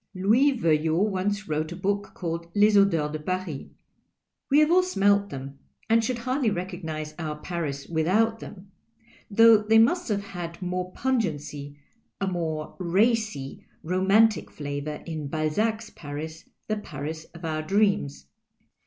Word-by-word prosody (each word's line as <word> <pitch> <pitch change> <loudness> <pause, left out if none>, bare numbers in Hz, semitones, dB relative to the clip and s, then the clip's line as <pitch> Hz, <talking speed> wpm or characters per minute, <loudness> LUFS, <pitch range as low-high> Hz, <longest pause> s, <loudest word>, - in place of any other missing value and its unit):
Louis 225 +10 +4
Veuillot 165 +3 +2
once 200 +2 -1
>vrote 155 -4 -3
a - - -7
book 200 +2 -2
called 170 -1 -4
" - - -34
Les 210 +1 +5
Odours 165 -7 +3
do 155 - -4
Paris." 185 -3 -4 0.8
We 285 - +4
have 305 +1 +5
all 365 +1 +6
smelt 200 - +2
them, 135 -2 -8 0.3
and 225 0 +5
should 250 +1 -1
hardly 255 +1 0
recognize 170 -5 -4
our 155 -2 -3
Paris 150 -5 -4
without 200 +8 +1
them 200 -1 -11 0.3
— 230 0 -29
though 230 -1 +9
they 220 +1 +4
must 250 +8 +3
have 200 -1 0
had 175 -4 -7
more 180 0 -3
pungency, 150 - -2 0.4
a 195 - 0
more 165 -4 -3
racy, 195 - 0 0.2
romantic 195 +6 +3
flavour 145 +1 -5
in 155 -4 -5
Ualzac's 215 +9 -1
Paris, 155 +2 -7 0.2
the 215 - -1
Paris 155 -4 -6
of 170 0 -8
our 155 -1 -1
dreams. 155 - +1
185 Hz, 145 wpm, -26 LUFS, 155-215 Hz, 0.8 s, though